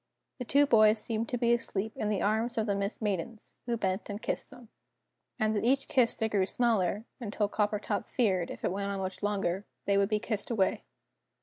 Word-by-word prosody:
The 250 - -4
two 285 +4 +4
boys 215 -4 +5
seemed 225 +1 -2
to 245 - -1
be 235 0 +3
asleep 220 -2 -1
in 210 - -2
the 205 -2 0
arms 220 +4 0
of 220 - +1
the 205 - 0
Mist 200 +3 -3
Maidens, 210 +2 -3
who 235 -1 0
bent 190 -1 -2
and 205 0 -4
kissed - - -3
them. 240 -3 -14 0.7
And 220 -2 +1
at 205 - 0
each 270 +3 +2
kiss 245 -3 +3
they 220 - 0
grew 200 -3 +1
smaller, 220 -3 +1
until 210 -3 -1
Coppertop 210 0 -1
feared, 190 -8 +1
if - - -6
it - - +1
went 200 +1 -2
on 200 0 -2
much 190 -1 -4
longer, 195 -2 -1 0.2
they 200 0 +3
would 200 0 +2
be 215 - +2
kissed 210 -1 -3
away. 205 -6 0
215 Hz, 210 wpm, -30 LUFS, 200-230 Hz, 0.7 s, boys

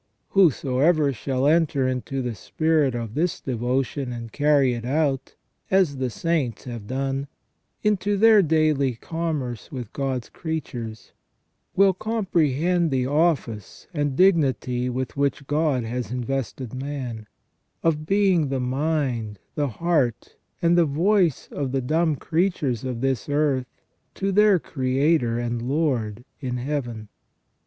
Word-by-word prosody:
Whosoever 150 -4 +3
shall 130 +2 -1
enter 150 -4 +3
into 130 +1 -2
the 120 -1 -2
spirit 150 - +1
of 115 -2 -4
this 170 +5 0
devotion 130 +1 -2
and 115 -2 -6
carry 145 -3 +3
it 120 -1 -5
out, 135 0 0 0.3
as 185 -7 +3
the 130 -1 -1
saints 145 -1 -1
have 120 -5 -7
done, 135 +2 -2 0.6
into 205 -1 +1
their 220 0 +7
daily 155 -6 +2
commerce 150 -4 -4
with 125 -6 -6
God's 130 -4 -2
creatures, 120 -9 -6 0.6
will 195 0 +5
comprehend 175 - +1
the 130 -2 0
office 140 - 0
and 145 -4 -1
dignity 130 - +2
with 125 -1 -3
which 140 0 0
God 145 -3 +1
has 120 -1 -4
invested 125 -1 -3
man, 130 -5 -5 0.6
of 155 -2 +1
being 195 -5 +3
the 135 -1 -1
mind, 130 -5 -1 0.2
the 145 -1 0
heart, 135 -2 0 0.3
and 170 +1 +4
the 175 -1 +5
voice 170 +2 +2
of 140 -3 -3
the 135 - +2
dumb 155 +4 +1
creatures 155 - 0
of 125 -3 -4
this 135 -1 -1
earth 145 -3 +1 0.5
to 195 0 -1
their 210 0 +5
Creator 130 -3 +1
and 120 -1 -2
Lord 125 -5 -1
in 125 -3 -3
Heaven. 120 -5 -3
140 Hz, 130 wpm, -24 LUFS, 125-160 Hz, 0.6 s, their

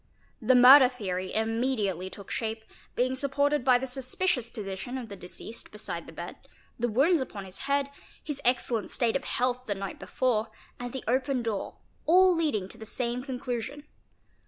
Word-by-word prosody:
The 255 - +4
murder 255 +2 +10
theory 190 -7 -4
immediately 220 -5 0
took 200 +1 -11
shape, 220 -1 -3 0.3
being 255 +1 +1
supported 285 +1 +1
by 250 -1 +6
the 255 - -3
suspicious 260 0 -1
position 205 +4 -5
of 240 -3 -6
the 200 - -7
deceased 190 +5 -7
beside 185 -5 -5
the - - -9
bed, 170 +2 -7 0.4
the 240 - +1
wounds 280 +8 +3
upon 205 -6 -6
his 185 0 -10
head, 280 0 +1 0.3
his 290 -2 -4
excellent 240 -3 +1
state 235 -3 0
of 275 - -1
health 250 0 0
the 205 - -1
night 195 -1 -6
before, 235 -3 0 0.3
and 245 0 -5
the 265 - -5
open 255 +1 +1
door, 220 -4 -3 0.3
all 365 +2 +6
leading 290 - 0
to 230 - -10
the 220 - -8
same 245 +1 -2
conclusion. 255 +1 -4
245 Hz, 170 wpm, -28 LUFS, 215-265 Hz, 0.4 s, murder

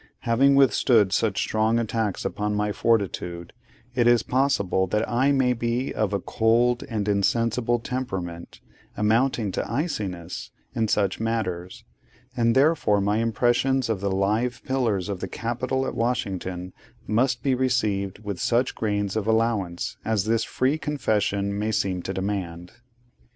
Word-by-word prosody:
Having 135 +4 +3
withstood 115 -6 +4
such 105 -2 +1
strong 110 +1 +1
attacks 110 -3 -1
upon 105 0 -2
my 105 0 0
fortitude, 95 -6 -1 0.4
it 120 -1 +2
is 120 -2 +5
possible 100 -8 +1
that 105 +4 0
I 130 +4 +2
may 130 -2 +3
be 120 +2 -2
of 110 -2 0
a 100 - 0
cold 120 +4 +2
and 105 -3 -2
insensible 115 +4 +1
temperament, 95 -9 -5 0.4
amounting 110 0 +1
to - - -3
iciness, 105 - -3 0.2
in 110 -1 0
such 100 -3 0
matters; 95 -6 -3 0.5
and 115 -1 +2
therefore 135 -7 +3
my 100 +2 +1
impressions 120 +3 +1
of 105 -4 -1
the 100 - 0
live 105 +6 0
pillars 115 -8 0
of 100 -3 -4
the - - -4
Capitol 130 +3 -2
at - - -3
Washington 95 -6 -2 0.3
must 120 +3 +1
be 135 - +2
received 110 -7 0
with 100 -3 -4
such 120 +2 +1
grains 100 -2 -1
of 110 -1 -1
allowance 110 -6 0
as 110 -3 0
this 115 0 +1
free 135 +7 0
confession 100 -9 -1
may 110 +1 -1
seem 95 -3 -1
to 95 - -4
demand. 95 -3 -4
110 Hz, 145 wpm, -25 LUFS, 100-120 Hz, 0.5 s, is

